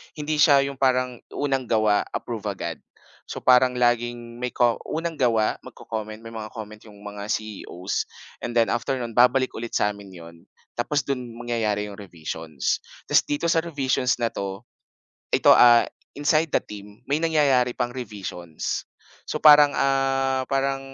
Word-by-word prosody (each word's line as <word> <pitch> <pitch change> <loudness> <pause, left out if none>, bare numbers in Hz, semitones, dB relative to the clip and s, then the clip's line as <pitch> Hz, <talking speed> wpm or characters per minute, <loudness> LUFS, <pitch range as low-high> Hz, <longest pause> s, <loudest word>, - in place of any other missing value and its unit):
Hindi 150 0 -2
siya 140 -2 +6
'yung 140 -1 -5
parang 125 -2 +1 0.2
unang 135 -3 -1
gawa, 110 -2 +2
approve 115 -3 -5
agad. 85 -4 -5 0.5
So, - - -6
parang 125 0 +5
laging 120 -1 0
may 125 0 -3
ko 120 -2 +3
unang 165 0 -3
gawa, 115 -4 +2
magko-comment, 110 0 -7
may 115 - -8
mga 110 -1 -7
comment 110 -1 -8
yung 105 -1 -15
mga 105 0 -7
CEO's 105 -5 -5 0.6
and 120 - -4
then 115 -1 +3
after 120 +3 -1
no'n, 120 -1 -4
babalik 125 +1 +4
ulit 120 0 -6
sa 105 - +2
amin 100 -2 -12
'yon 85 -1 -12 0.4
tapos 140 +4 0
do'n 125 -3 -3
mangyayari 115 -3 -2
'yung 100 - -9
revisions. 80 -6 -4 0.3
Tapos - - +5
dito 145 +3 -1
sa 165 -1 +2
revisions 130 -5 0
na 120 - +2
'to, 100 -1 -5 0.8
ito - - +6
a 120 -1 +7 0.3
inside 155 +2 +2
the - - +3
team, 105 +2 -12
may 145 +2 0
nangyayari 140 -7 +2
pang 120 -1 -2
revisions. 95 -9 -5 0.4
So, - - -2
parang, 150 -1 +8
ah, 135 -1 +1
parang, 135 0 0
120 Hz, 160 wpm, -24 LUFS, 105-135 Hz, 0.8 s, parang